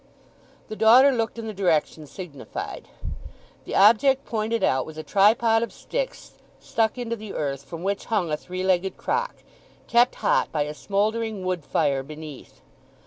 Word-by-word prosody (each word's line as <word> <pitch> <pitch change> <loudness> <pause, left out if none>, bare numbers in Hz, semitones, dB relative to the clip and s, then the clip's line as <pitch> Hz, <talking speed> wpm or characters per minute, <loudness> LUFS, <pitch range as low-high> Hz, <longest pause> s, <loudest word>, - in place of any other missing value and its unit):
The 215 - -6
daughter 245 +6 +7
looked 230 -2 -2
in 230 - -5
the 220 - -5
direction 165 -5 0
signified. 155 -3 -7 0.8
The - - -4
object 245 +7 +5
pointed 225 0 -1
out 130 0 +2
was 155 +2 -10
a 155 - -5
tripod 225 +4 +4
of 235 - -3
sticks - - -5 0.3
stuck 225 +1 0
into 235 -2 -3
the 215 -2 -8
earth, 140 -2 -2
from 165 +5 -8
which 200 +1 -2
hung 195 -8 0
a - - +2
three 185 +4 -6
legged 190 0 +1
crock, 485 +2 -1 0.5
kept 240 +1 +3
hot - - +1
by 150 -2 0
a 150 +1 -5
smouldering 210 +4 -1
wood 180 -3 -2
fire 140 -3 +1
beneath. 150 0 -10
200 Hz, 160 wpm, -24 LUFS, 155-225 Hz, 0.8 s, daughter